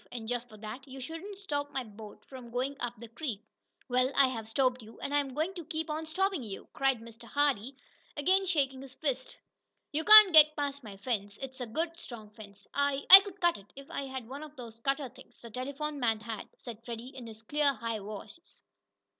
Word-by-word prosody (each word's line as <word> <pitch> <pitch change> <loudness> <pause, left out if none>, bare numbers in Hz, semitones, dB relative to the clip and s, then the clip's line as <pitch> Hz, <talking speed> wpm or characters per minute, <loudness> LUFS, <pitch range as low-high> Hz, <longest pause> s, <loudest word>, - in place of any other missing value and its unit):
And, 230 -3 -6
just 245 0 -3
for 215 - -13
that, 220 +6 -8
you 265 0 -9
shouldn't 330 +9 -7
stop 290 -7 -3
my 265 -2 -2
boat 210 -1 -12
from 255 -3 -11
going 255 +4 -2
up 245 -1 -3
the 235 +2 -10
creek." 230 -2 -5 0.5
"Well, 255 +1 +2
I 275 -2 +6
have 225 -3 -6
stopped 255 +1 +1
you, 220 +1 -14
and 285 - -4
I'm 280 -3 0
going 320 +5 -1
to 350 -3 -6
keep 315 +1 -4
on 315 +1 -4
stoppin' 380 0 0
you!" 210 -5 -8
cried 270 -4 +1
Mr. 230 +1 -13
Hardee, 275 -2 0 0.4
again 380 +6 +3
shaking 270 -6 0
his 270 -1 -11
fist. 265 -4 -3 0.5
"You 310 +2 0
can't 425 -2 +10
get 305 -1 +8
past 285 -2 -3
my 205 -3 -10
fence. 205 -2 -3
It's 260 -1 -7
a 245 - -3
good 330 +8 -3
strong 220 -8 -9
fence." 205 -2 -13
"I 280 0 0
I 385 - +16
could 400 0 -9
cut 345 -2 +2
it, 200 - -19
if 275 +4 -12
I 280 -4 -3
had 260 -3 -6
one 275 +4 -7
of 305 -1 -10
those 230 -3 -10
cutter 275 +3 -1
things, 250 - -17
the 235 - -12
telephone 280 +5 -4
man 225 -4 +1
had," 220 -1 -6
said 230 -2 -10
Freddie, 235 +2 -7
in 250 -3 -8
his 220 0 -12
clear, 290 +4 +2
high 230 -2 -3
voice. 210 - -11
265 Hz, 215 wpm, -30 LUFS, 230-295 Hz, 0.5 s, I